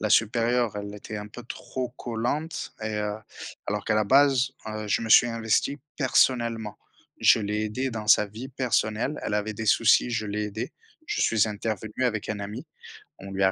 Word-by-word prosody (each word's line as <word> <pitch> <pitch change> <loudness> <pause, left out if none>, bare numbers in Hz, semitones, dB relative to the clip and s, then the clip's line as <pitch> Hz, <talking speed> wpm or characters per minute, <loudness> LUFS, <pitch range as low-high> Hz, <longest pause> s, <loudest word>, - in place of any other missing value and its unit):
La 110 - 0
supérieure, 115 +1 +2
elle 100 0 -5
était 105 +1 -7
un 105 - -6
peu 120 +3 -10
trop 125 +1 -5
collante 125 +7 -3
et 110 0 -2
heu 105 0 -1 0.5
alors 105 0 -2
qu'à 110 - +1
la 110 0 +3
base, 130 +2 +4
heu, 110 0 -4
je 105 - +1
me 115 - -4
suis 120 - +8
investi 115 +4 0 0.2
personnellement. 120 -5 +1 0.4
Je - - +6
l'ai 105 +1 -1
aidée 130 +5 -2
dans 110 -2 -5
sa 105 0 +6
vie 110 +6 -8
personnelle. 125 0 0
Elle - - -2
avait 105 +1 -1
des 110 +1 -5
soucis. 115 +3 +4
Je 110 -2 -1
l'ai 105 +1 -2
aidée. 105 +2 -5 0.3
Je 420 - -2
suis 115 -1 +3
intervenu 110 +3 -3
avec 110 -4 -1
un 105 -1 -3
ami. 100 +2 -6 0.5
On 95 +1 -9
lui 95 0 0
a 95 - +5
110 Hz, 190 wpm, -26 LUFS, 105-120 Hz, 0.5 s, suis